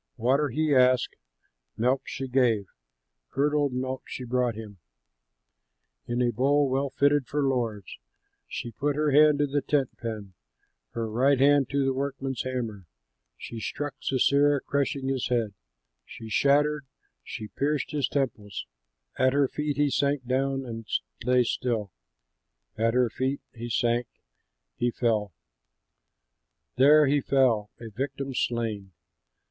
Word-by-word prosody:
Water 135 Hz, +5 st, +2 dB
he 155 Hz, +4 st, +1 dB
asked, 130 Hz, -1 st, +3 dB, 0.6 s
milk 125 Hz, +4 st, +2 dB
she 135 Hz, -, -5 dB
gave, 120 Hz, -5 st, +2 dB, 0.6 s
Curdled 145 Hz, +1 st, +1 dB
milk 130 Hz, +1 st, -3 dB
she 130 Hz, -, -6 dB
brought 125 Hz, -1 st, 0 dB
him 105 Hz, -3 st, -9 dB, 1.3 s
In 120 Hz, +1 st, 0 dB
a 120 Hz, -, +2 dB
bowl 140 Hz, +3 st, +2 dB
well 135 Hz, +1 st, 0 dB
fitted 145 Hz, -1 st, +2 dB
for 145 Hz, +2 st, -1 dB
lords! 115 Hz, -7 st, -2 dB, 0.5 s
She 120 Hz, -, -5 dB
put 145 Hz, +5 st, -1 dB
her 150 Hz, 0 st, +1 dB
hand 150 Hz, +1 st, +6 dB
to 145 Hz, -, +2 dB
the 145 Hz, 0 st, -1 dB
tent 140 Hz, -3 st, 0 dB
pin, 110 Hz, -5 st, -6 dB, 0.6 s
Her 115 Hz, -1 st, -2 dB
right 130 Hz, +5 st, +2 dB
hand 140 Hz, 0 st, +4 dB
to 140 Hz, -1 st, +1 dB
the 135 Hz, -, +1 dB
workman's 135 Hz, -2 st, -3 dB
hammer. 115 Hz, -8 st, -4 dB, 0.5 s
She 115 Hz, -, -7 dB
struck 145 Hz, +5 st, -4 dB
Sisera, 140 Hz, +2 st, +3 dB
crushing 140 Hz, -1 st, -1 dB
his 135 Hz, -2 st, -1 dB
head, 115 Hz, -4 st, 0 dB, 0.5 s
She 115 Hz, -1 st, -10 dB
shattered, 145 Hz, +3 st, +2 dB, 0.4 s
she 110 Hz, -1 st, -7 dB
pierced 145 Hz, +1 st, -1 dB
his 145 Hz, -4 st, 0 dB
temples. 115 Hz, -7 st, -3 dB, 0.5 s
At 130 Hz, 0 st, +4 dB
her 140 Hz, -1 st, +3 dB
feet 150 Hz, 0 st, -3 dB
he 145 Hz, -1 st, +2 dB
sank 140 Hz, -2 st, 0 dB
down 135 Hz, +1 st, 0 dB
and 115 Hz, -2 st, -7 dB, 0.4 s
lay 125 Hz, +1 st, +4 dB
still, 115 Hz, -4 st, -2 dB, 0.8 s
At 115 Hz, +2 st, +1 dB
her 125 Hz, -2 st, +3 dB
feet 135 Hz, +4 st, -2 dB
he 120 Hz, 0 st, -7 dB
sank, 120 Hz, 0 st, +1 dB, 0.7 s
he 120 Hz, -, 0 dB
fell; 110 Hz, -4 st, 0 dB, 1.5 s
There 150 Hz, +3 st, +7 dB
he 145 Hz, +1 st, +2 dB
fell, 125 Hz, -7 st, +2 dB
a 115 Hz, -2 st, -9 dB
victim 135 Hz, +4 st, -4 dB
slain! 110 Hz, -6 st, -2 dB
130 Hz, 135 wpm, -27 LUFS, 115-140 Hz, 1.5 s, There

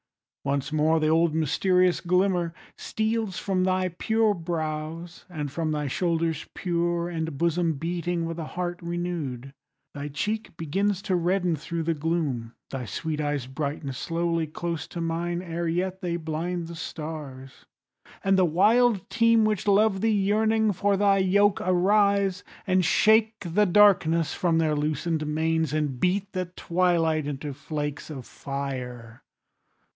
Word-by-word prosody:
Once 140 Hz, +2 st, -1 dB
more 155 Hz, +1 st, +3 dB
the 155 Hz, -, +1 dB
old 160 Hz, 0 st, +3 dB
mysterious 180 Hz, +4 st, +2 dB
glimmer 180 Hz, -1 st, +1 dB, 0.2 s
steals 220 Hz, -3 st, -2 dB
From 190 Hz, -2 st, 0 dB
thy 185 Hz, 0 st, +1 dB
pure 220 Hz, +5 st, +1 dB
brows, 165 Hz, -1 st, -4 dB
and 150 Hz, -5 st, -4 dB
from 160 Hz, +1 st, -2 dB
thy 150 Hz, -1 st, -1 dB
shoulders 165 Hz, +1 st, -1 dB
pure, 175 Hz, -1 st, 0 dB
And 160 Hz, -4 st, -4 dB
bosom 170 Hz, +1 st, +1 dB
beating 170 Hz, +2 st, -2 dB
with 165 Hz, 0 st, -5 dB
a 160 Hz, -, -3 dB
heart 175 Hz, -1 st, -2 dB
renew'd. 170 Hz, -7 st, -4 dB, 0.4 s
Thy 145 Hz, 0 st, -5 dB
cheek 205 Hz, +6 st, -3 dB
begins 195 Hz, +5 st, -1 dB
to 185 Hz, -, 0 dB
redden 180 Hz, 0 st, +1 dB
thro' 165 Hz, +2 st, -4 dB
the 165 Hz, +1 st, +1 dB
gloom, 145 Hz, -7 st, -2 dB, 0.2 s
Thy 130 Hz, -2 st, -4 dB
sweet 155 Hz, +5 st, -3 dB
eyes 145 Hz, -3 st, -1 dB
brighten 140 Hz, +1 st, -4 dB
slowly 165 Hz, +3 st, -1 dB
close 165 Hz, 0 st, -4 dB
to 175 Hz, -, -7 dB
mine, 170 Hz, +1 st, -2 dB
Ere 170 Hz, -1 st, -3 dB
yet 185 Hz, +3 st, -1 dB
they 175 Hz, -2 st, -2 dB
blind 165 Hz, +2 st, -3 dB
the 170 Hz, +1 st, -8 dB
stars, 150 Hz, -5 st, -7 dB, 0.6 s
and 195 Hz, -1 st, +3 dB
the -, -, +5 dB
wild 205 Hz, +4 st, +3 dB
team 230 Hz, -1 st, +4 dB
Which 215 Hz, -1 st, -1 dB
love 200 Hz, -1 st, +3 dB
thee, 225 Hz, -, +2 dB
yearning 215 Hz, +1 st, +2 dB
for 200 Hz, +1 st, +1 dB
thy 200 Hz, -1 st, +4 dB
yoke, 200 Hz, +2 st, +3 dB
arise, 200 Hz, +1 st, +2 dB, 0.2 s
And 185 Hz, -1 st, +2 dB
shake 220 Hz, +5 st, +4 dB
the 200 Hz, +4 st, +2 dB
darkness 170 Hz, -5 st, +4 dB
from 170 Hz, -2 st, +1 dB
their 155 Hz, -2 st, +2 dB
loosen'd 155 Hz, +1 st, -1 dB
manes, 160 Hz, 0 st, 0 dB
And 150 Hz, -4 st, -1 dB
beat 190 Hz, +5 st, 0 dB
the 185 Hz, -1 st, -2 dB
twilight 170 Hz, -3 st, +1 dB
into 145 Hz, 0 st, -4 dB
flakes 145 Hz, +1 st, -5 dB
of 135 Hz, -5 st, -7 dB
fire. 125 Hz, -4 st, -6 dB
170 Hz, 145 wpm, -26 LUFS, 155-185 Hz, 0.6 s, the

